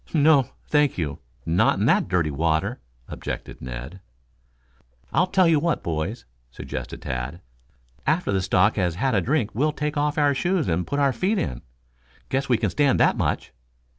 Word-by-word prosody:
"No, 145 Hz, -3 st, +5 dB, 0.2 s
thank 150 Hz, -2 st, +2 dB
you 75 Hz, -5 st, -3 dB, 0.3 s
not 85 Hz, +2 st, +3 dB
in -, -, +1 dB
that -, -, +3 dB
dirty 90 Hz, -4 st, +1 dB
water," 80 Hz, +2 st, 0 dB, 0.3 s
objected -, -, -6 dB
Ned. 65 Hz, +8 st, -7 dB, 1.1 s
"I'll 180 Hz, -, +3 dB
tell 185 Hz, -1 st, +3 dB
you 160 Hz, -3 st, +4 dB
what, 170 Hz, +1 st, -1 dB
boys," 85 Hz, +8 st, -3 dB, 0.2 s
suggested -, -, -7 dB
Tad. 65 Hz, +6 st, -4 dB, 0.7 s
"After 160 Hz, -5 st, +1 dB
the 95 Hz, -1 st, +1 dB
stock 95 Hz, +3 st, +2 dB
has 90 Hz, -4 st, 0 dB
had 130 Hz, +7 st, 0 dB
a 100 Hz, -, +3 dB
drink 120 Hz, -, 0 dB
we'll 150 Hz, +7 st, +1 dB
take 150 Hz, 0 st, -3 dB
off 150 Hz, +1 st, 0 dB
our 145 Hz, -1 st, +3 dB
shoes 175 Hz, +3 st, 0 dB
and 90 Hz, +1 st, 0 dB
put 140 Hz, -, -2 dB
our 140 Hz, -2 st, +3 dB
feet 200 Hz, -, 0 dB
in. 60 Hz, -, -2 dB, 0.7 s
Guess 135 Hz, +1 st, -1 dB
we 120 Hz, -, +4 dB
can 105 Hz, -4 st, -1 dB
stand 145 Hz, -2 st, +2 dB
that -, -, +4 dB
much." -, -, -2 dB
120 Hz, 170 wpm, -24 LUFS, -, 1.1 s, No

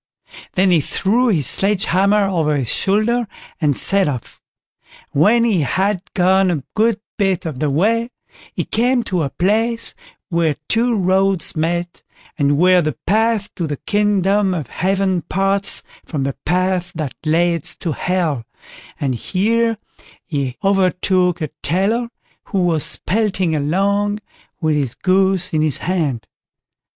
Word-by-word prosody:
Then 185 Hz, 0 st, +3 dB
he 165 Hz, -3 st, +4 dB
threw 225 Hz, -, +1 dB
his 165 Hz, -, +3 dB
sledge 195 Hz, -, +2 dB
hammer 200 Hz, +3 st, +3 dB
over 160 Hz, -6 st, 0 dB
his 125 Hz, -4 st, 0 dB
shoulder 215 Hz, +4 st, +1 dB, 0.3 s
and 145 Hz, -5 st, +1 dB
set 195 Hz, -2 st, +3 dB
off; 130 Hz, -6 st, -5 dB, 0.7 s
and 140 Hz, -, +1 dB
when 230 Hz, +7 st, +5 dB
he 210 Hz, -8 st, +2 dB
had 190 Hz, +6 st, 0 dB
gone 190 Hz, 0 st, +3 dB
a 155 Hz, -6 st, -1 dB
good 220 Hz, 0 st, +2 dB, 0.2 s
bit 195 Hz, -4 st, 0 dB
of 150 Hz, -6 st, -5 dB
the 150 Hz, -, 0 dB
way, 225 Hz, -, +1 dB, 0.5 s
he -, -, -1 dB
came 245 Hz, +2 st, +1 dB
to 180 Hz, -5 st, -1 dB
a 140 Hz, -, -1 dB
place 225 Hz, -, 0 dB, 0.4 s
where 170 Hz, -4 st, +1 dB
two 235 Hz, +1 st, +1 dB
roads 190 Hz, -1 st, +1 dB
met, 170 Hz, +2 st, -2 dB, 0.3 s
and 145 Hz, -2 st, +1 dB
where 180 Hz, +2 st, +5 dB
the 155 Hz, -6 st, -2 dB
path 220 Hz, 0 st, +1 dB
to 170 Hz, -4 st, -3 dB
the 145 Hz, -1 st, -4 dB
kingdom 205 Hz, -1 st, +1 dB
of 150 Hz, -8 st, -5 dB
Heaven 190 Hz, 0 st, 0 dB
parts 195 Hz, +4 st, 0 dB, 0.2 s
from 145 Hz, -5 st, -3 dB
the 135 Hz, 0 st, -2 dB
path 180 Hz, +1 st, 0 dB
that 155 Hz, -5 st, -4 dB
leads 165 Hz, 0 st, +1 dB
to 170 Hz, -, -4 dB
Hell, 160 Hz, -5 st, -1 dB, 0.6 s
and 135 Hz, -3 st, -1 dB
here 225 Hz, -, 0 dB, 0.5 s
he 135 Hz, -5 st, -3 dB
overtook 185 Hz, -2 st, +1 dB
a 155 Hz, -, -2 dB
tailor, 200 Hz, -, 0 dB, 0.4 s
who 195 Hz, -4 st, -1 dB
was 165 Hz, -4 st, 0 dB
pelting 190 Hz, -5 st, 0 dB
along 200 Hz, +7 st, 0 dB, 0.4 s
with 155 Hz, -3 st, +1 dB
his 135 Hz, -5 st, -2 dB
goose 190 Hz, -1 st, +1 dB
in 155 Hz, -, +2 dB
his 155 Hz, -3 st, +1 dB
hand. 155 Hz, -10 st, -2 dB
185 Hz, 145 wpm, -18 LUFS, 160-205 Hz, 0.7 s, when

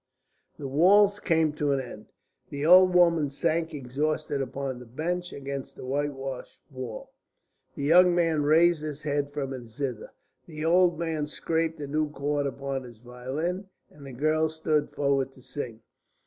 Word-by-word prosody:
"The 140 Hz, -, -5 dB
waltz 200 Hz, +8 st, +5 dB
came 160 Hz, -5 st, +1 dB
to 145 Hz, -1 st, 0 dB
an 135 Hz, -, 0 dB
end. 120 Hz, -4 st, -9 dB, 0.4 s
The 145 Hz, +1 st, -4 dB
old 180 Hz, +2 st, +7 dB
woman 170 Hz, -4 st, +4 dB
sank 160 Hz, +3 st, -1 dB
exhausted 145 Hz, +1 st, -2 dB
upon 135 Hz, -1 st, -4 dB
the 125 Hz, -, -11 dB
bench 175 Hz, +8 st, -3 dB
against 140 Hz, -1 st, -6 dB
the -, -, -9 dB
whitewashed 135 Hz, -1 st, -4 dB
wall; 130 Hz, -4 st, -7 dB, 0.6 s
the 140 Hz, -, -5 dB
young 175 Hz, +4 st, +6 dB
man 165 Hz, -3 st, +2 dB
raised 160 Hz, +2 st, +4 dB
his 150 Hz, -1 st, -6 dB
head 145 Hz, -1 st, -1 dB
from 140 Hz, -2 st, -4 dB
his 120 Hz, -4 st, -9 dB
zither; 130 Hz, -5 st, -4 dB, 0.4 s
the 155 Hz, -2 st, -6 dB
old 175 Hz, 0 st, +4 dB
man 160 Hz, -3 st, -2 dB
scraped 160 Hz, +1 st, -2 dB
a -, -, -3 dB
new 150 Hz, +2 st, -1 dB
chord 145 Hz, 0 st, -1 dB
upon 140 Hz, -1 st, -4 dB
his 120 Hz, -3 st, -12 dB
violin, 130 Hz, -, -4 dB, 0.2 s
and 145 Hz, -, -15 dB
the -, -, -8 dB
girl 155 Hz, +5 st, +1 dB
stood 155 Hz, -1 st, 0 dB
forward 135 Hz, -2 st, 0 dB
to 130 Hz, -, -18 dB
sing. 125 Hz, -4 st, -6 dB
145 Hz, 160 wpm, -27 LUFS, 135-160 Hz, 0.6 s, old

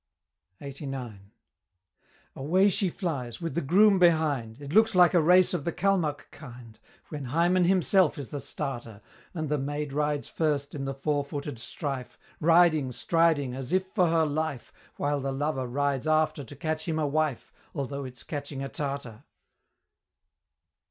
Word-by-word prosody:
LXXXIX. 135 Hz, -6 st, -6 dB, 1.2 s
Away 180 Hz, +9 st, +3 dB
she 190 Hz, 0 st, 0 dB
flies, 140 Hz, -, -4 dB
with 165 Hz, -2 st, -4 dB
the 170 Hz, -, -1 dB
groom 195 Hz, +7 st, +5 dB
behind, 150 Hz, -10 st, +2 dB
It 145 Hz, +1 st, -7 dB
looks 220 Hz, 0 st, +4 dB
like 180 Hz, 0 st, +6 dB
a 175 Hz, -, +5 dB
race 180 Hz, +3 st, +5 dB
of 170 Hz, -5 st, -2 dB
the 170 Hz, -, -1 dB
Calmuck 175 Hz, -6 st, 0 dB
kind, 120 Hz, -5 st, -12 dB, 0.3 s
When 145 Hz, -3 st, -6 dB
Hymen 170 Hz, +7 st, +2 dB
himself 185 Hz, -1 st, +3 dB
is 140 Hz, -4 st, -7 dB
the 145 Hz, -, -4 dB
starter, 120 Hz, -8 st, -5 dB, 0.3 s
And 155 Hz, -2 st, -2 dB
the 150 Hz, 0 st, 0 dB
Maid 145 Hz, +1 st, -3 dB
rides 150 Hz, 0 st, -1 dB
first 145 Hz, -3 st, -1 dB
in 135 Hz, -2 st, -4 dB
the 135 Hz, 0 st, -3 dB
fourfooted 145 Hz, -2 st, -3 dB
strife, 130 Hz, +1 st, -5 dB, 0.2 s
Riding, 165 Hz, -4 st, +4 dB
striding, 160 Hz, -2 st, +1 dB
as 130 Hz, -1 st, -6 dB
if 185 Hz, +1 st, +2 dB
for 185 Hz, -3 st, +2 dB
her 165 Hz, -1 st, +3 dB
life, 150 Hz, -3 st, -3 dB, 0.2 s
While 145 Hz, 0 st, -1 dB
the 135 Hz, 0 st, -2 dB
Lover 135 Hz, -1 st, -2 dB
rides 140 Hz, +2 st, -1 dB
after 155 Hz, -2 st, +1 dB
to 130 Hz, -, -11 dB
catch 155 Hz, +3 st, -3 dB
him 160 Hz, -1 st, -1 dB
a 155 Hz, -, +1 dB
wife, 150 Hz, -2 st, -1 dB, 0.2 s
Although 140 Hz, -1 st, -3 dB
it's 125 Hz, -3 st, -9 dB
catching 140 Hz, -2 st, -5 dB
a 135 Hz, -, -4 dB
Tartar. 140 Hz, -5 st, -5 dB
145 Hz, 155 wpm, -27 LUFS, 135-165 Hz, 1.2 s, like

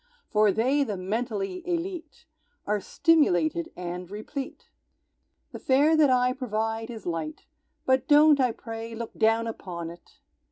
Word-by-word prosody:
For 210 Hz, -1 st, +4 dB
they, 260 Hz, +8 st, +2 dB
the 210 Hz, -7 st, -4 dB
mentally 215 Hz, -, -3 dB
élite, 340 Hz, -3 st, -4 dB, 0.4 s
Are 210 Hz, 0 st, 0 dB
stimulated 175 Hz, -, +2 dB
and 180 Hz, 0 st, -6 dB
replete. 215 Hz, +7 st, -7 dB, 0.8 s
The -, -, -8 dB
fare 285 Hz, +4 st, +3 dB
that 305 Hz, -3 st, +5 dB
I 250 Hz, 0 st, +3 dB
provide 225 Hz, -2 st, -3 dB
is 225 Hz, -4 st, -8 dB
light, 165 Hz, -3 st, -4 dB, 0.4 s
But 260 Hz, 0 st, +2 dB
don't, 295 Hz, 0 st, +6 dB
I 250 Hz, -2 st, +3 dB
pray, 225 Hz, 0 st, -7 dB
look 230 Hz, 0 st, -6 dB
down 225 Hz, +1 st, +2 dB
upon 175 Hz, -7 st, -6 dB
it! 170 Hz, 0 st, -17 dB
225 Hz, 135 wpm, -26 LUFS, 195-275 Hz, 0.8 s, don't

